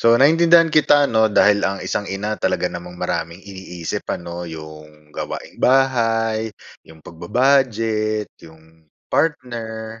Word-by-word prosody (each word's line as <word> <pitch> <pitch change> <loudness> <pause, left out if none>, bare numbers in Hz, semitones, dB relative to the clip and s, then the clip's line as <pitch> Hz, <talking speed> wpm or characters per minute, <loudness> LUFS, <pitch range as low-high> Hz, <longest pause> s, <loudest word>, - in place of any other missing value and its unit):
So, 115 0 +5
naintindihan 165 +5 +5
kita, 145 -1 +4
'no, 110 -1 +3
dahil 105 0 +4
ang 95 0 -2
isang 105 - -2
ina 105 +2 -3
talaga - - 0
namang 90 0 -9
maraming 85 +2 -3
iniisip, 95 -4 -6
ano, 85 0 -6
'yong 75 -1 -11
gawaing-bahay, 115 -4 0 0.3
'yong 80 0 -17
pagba-budget, 110 +1 0 0.2
'yong 80 0 -19 0.2
partner, 115 -7 -2
110 Hz, 115 wpm, -20 LUFS, 85-120 Hz, 0.3 s, So